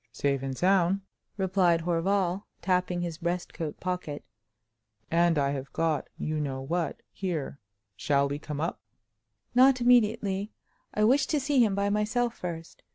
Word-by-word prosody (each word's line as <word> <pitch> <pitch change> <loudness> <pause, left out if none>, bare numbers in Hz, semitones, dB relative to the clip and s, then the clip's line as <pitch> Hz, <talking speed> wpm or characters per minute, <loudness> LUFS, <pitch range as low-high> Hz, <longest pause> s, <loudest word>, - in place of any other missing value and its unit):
"Safe 140 +1 0
and 135 -1 -4
sound!" 190 +1 +3 0.4
replied 185 -3 +2
Horval, 180 +3 0 0.2
tapping 180 -1 +1
his 170 -2 -4
breastcoat 170 -3 -3
pocket—"and 115 - -3
I 140 -1 +2
have 135 -1 -5
got 160 -2 0
you 155 0 -2
know 135 -3 -2
what 165 +5 -2
here. 165 -7 -4 0.4
Shall 140 +4 +2
we 145 +1 -4
come 150 -2 -6
up?" 165 +3 -2 0.7
"Not 255 +1 +6
immediately. 220 -4 +2 0.4
I 210 - 0
wish 260 +6 +4
to 300 - +1
see 275 -2 +3
him 205 -4 +1
by 200 0 +1
myself 225 +3 0
first. 165 -2 -7
175 Hz, 140 wpm, -28 LUFS, 145-200 Hz, 0.7 s, Not